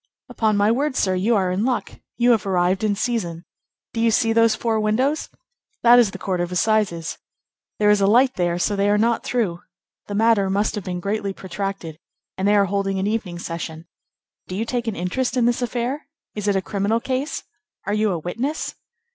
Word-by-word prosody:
"Upon 215 -2 +1
my 205 +2 +3
word, 275 +3 0
sir, 190 -6 +1
you 200 +6 +2
are 190 -3 +1
in 190 +3 0
luck; 250 0 -2 0.2
you 245 0 +4
have 220 -4 +2
arrived 185 +1 +1
in 210 -1 +2
season. 190 -7 -2 0.5
Do 225 - -1
you 230 - +4
see 225 0 +2
those 230 -1 +4
four 225 -2 0
windows? 250 +8 0 0.5
That 240 +1 +8
is 235 -4 +4
the - - -8
Court 185 -2 -2
of 175 0 -3
Assizes. 180 -4 0 0.6
There 210 0 +4
is 210 -1 +3
light 245 +7 +4
there, 175 -4 0
so 205 +3 0
they 200 +1 +2
are 205 - +3
not 230 +2 +1
through. 205 -9 -1 0.5
The 205 - -4
matter 215 -2 +3
must 200 +2 +1
have 210 - -4
been 180 -1 -4
greatly 200 0 -2
protracted, 190 -4 -5 0.4
and 190 +1 -1
they 205 - +4
are 200 -1 +4
holding 195 0 -1
an 190 - -1
evening 205 -5 -2
session. 165 -1 -6 0.6
Do 185 - -5
you 220 +4 -1
take 240 0 -2
an 220 - -1
interest 245 +9 -1
in 240 - +3
this 240 +1 +1
affair? 245 +5 -2 0.3
Is 210 -1 -4
it 200 - +2
a 190 - 0
criminal 205 +4 0
case? 265 +4 -3 0.4
Are 205 - -1
you 215 0 +2
a 175 - -1
witness?" 235 - -3
210 Hz, 205 wpm, -22 LUFS, 190-230 Hz, 0.6 s, That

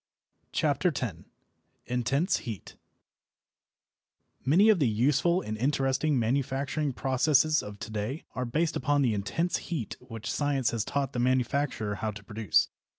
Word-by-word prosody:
CHAPTER 155 +4 +1
X 130 - -1 0.7
INTENSE 135 - +1
HEAT 110 -7 -7 1.7
Many 185 +11 +5
of 210 -5 +5
the 140 - +3
useful 140 - +2
and 110 - -4
interesting 135 +3 +1
manufacturing 135 +4 0
processes 140 +4 +2
of 105 0 -8
to 110 +1 -7
day 110 +8 -3
are 125 - -2
based 155 +7 0
upon 145 -1 +2
the 120 -4 +2
intense 160 - -1
heat 150 - -3
which 115 -3 -6
science 140 -4 +1
has 115 -3 -1
taught 140 +1 -2
the 120 - -2
manufacturer 125 -3 0
how 110 +2 -3
to 100 -1 -8
produce. 105 -4 +1
130 Hz, 140 wpm, -28 LUFS, 115-145 Hz, 1.7 s, Many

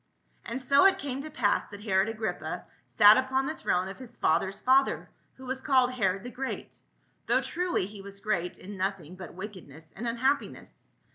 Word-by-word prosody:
And 235 +3 -4
so 275 +4 +4
it 385 - +2
came 275 -1 -4
to 310 - -7
pass 235 -9 +1
that 205 0 -11
Herod 195 -1 +2
Agrippa 220 0 -4 0.2
sat 210 +1 +7
upon 260 +1 +1
the 310 - -2
throne 180 - 0
of 195 - -8
his 250 -2 -11
father's 190 +5 +1
father, 265 +1 +2 0.2
who 260 - -12
was 260 +1 -3
called 260 -3 +3
Herod 195 -5 0
the 245 - -7
Great, 265 +1 -6 0.5
though - - +3
truly 355 - -1
he 205 +1 -10
was 200 0 -10
great 190 -5 -2
m 200 +1 -9
noth 195 +1 -1
ing 165 +1 -12
but 185 -2 -10
wickedness 175 -6 -10
and 235 +5 -4
unhappiness. 260 +5 -2
220 Hz, 190 wpm, -28 LUFS, 190-260 Hz, 0.5 s, sat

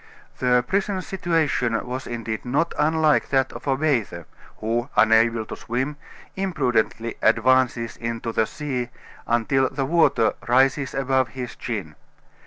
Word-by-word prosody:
The 125 -1 +3
prisoner's 195 -1 -1
situation 155 -11 0
was 130 +1 -5
indeed 115 -2 -4
not 145 +7 0
unlike 155 0 +2
that 135 -1 +1
of - - -9
a 135 -1 +2
bather, 120 - -1 0.3
who, 120 +4 -2
unable 115 0 +4
to - - -7
swim, 130 +5 -3 0.4
imprudently 125 - -1
advances 115 0 +2
into 115 0 -4
the 110 0 +1
sea 130 -5 -4 0.4
until 130 +3 +2
the 135 0 -2
water 160 -7 +3
rises 135 +3 +2
above 130 -1 +1
his 125 +1 -7
chin. 100 -10 -5
125 Hz, 130 wpm, -23 LUFS, 115-145 Hz, 0.4 s, unable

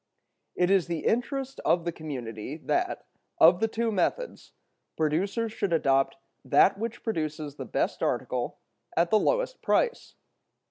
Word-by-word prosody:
It 180 +1 +2
is 195 -3 +3
the 170 -2 -3
interest 270 +3 -1
of 170 -1 +2
the 170 - 0
community 130 -5 -6
that, 355 - -1 0.3
of 175 +2 +7
the 225 - +2
two 225 +1 -1
methods, 345 - -2 0.4
producers 195 +9 0
should 200 -4 -2
adopt 135 -3 +2 0.3
that 185 +7 +4
which 230 +1 -4
produces 155 -8 -3
the - - -5
best - - -1
article - - -1 0.4
at 170 +1 +3
the 215 - +5
lowest - - 0
price. 485 -1 0
180 Hz, 140 wpm, -28 LUFS, 155-230 Hz, 0.4 s, of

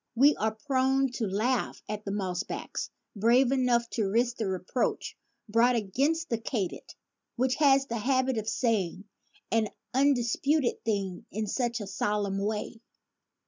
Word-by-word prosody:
We 280 +5 +6
are 220 +1 0
prone 270 -1 +2
to 235 -3 -2
laugh 220 +7 -1
at 210 0 -5
the 200 - -3
mossbacks 190 -2 -3 0.3
brave 240 +5 +4
enough 250 -3 +2
to 215 -4 0
risk 235 +3 +1
the 220 - -1
reproach 190 +6 -2 0.3
brought 235 +3 +4
against 280 - 0
the 230 - 0
katy 220 -5 -2
did, - - -16 0.4
which 255 +1 +1
has 275 -2 +5
the 235 -3 -3
habit 260 0 +1
of 215 0 -3
saying 200 -6 0 0.5
"an 225 -1 +2 0.3
undis 260 -3 +2
puted 290 -3 +1
thing 195 -5 -2
in 215 +2 -2
such 240 +2 -1
a - - -4
solemn 200 0 -1
way." 215 +2 -3
230 Hz, 150 wpm, -29 LUFS, 210-260 Hz, 0.5 s, We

